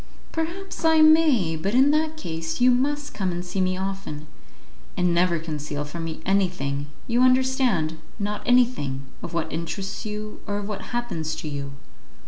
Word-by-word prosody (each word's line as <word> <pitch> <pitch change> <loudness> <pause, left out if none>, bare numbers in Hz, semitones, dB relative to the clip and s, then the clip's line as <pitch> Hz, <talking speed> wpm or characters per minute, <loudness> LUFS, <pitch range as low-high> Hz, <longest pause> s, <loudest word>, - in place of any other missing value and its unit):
"Perhaps 340 +5 -4
I 320 -1 +5
may; 310 - +5
but 195 +8 -1
in 270 +3 +6
that 310 +1 +1
case 165 - -4
you 250 +1 +6
must 290 +4 0
come 190 -3 -1
and 175 +1 -4
see 185 +2 -2
me 185 0 +1
often, 190 -6 -4 0.7
and 180 -1 +2
never 175 0 +3
conceal 150 -2 -4
from 165 +3 -5
me 160 -1 -5
anything, 175 -8 0 0.2
you 240 0 +2
understand, 255 - +3 0.2
not 210 0 -2
anything, 240 - +2 0.2
of - - -6
what 165 -1 -2
interests 170 +4 -4
you, 215 0 -6
or 205 - -1
of 205 -1 -4
what 210 -2 -5
happens 200 -11 -2
to - - -6
you." 140 -1 -4
195 Hz, 165 wpm, -25 LUFS, 160-255 Hz, 0.7 s, in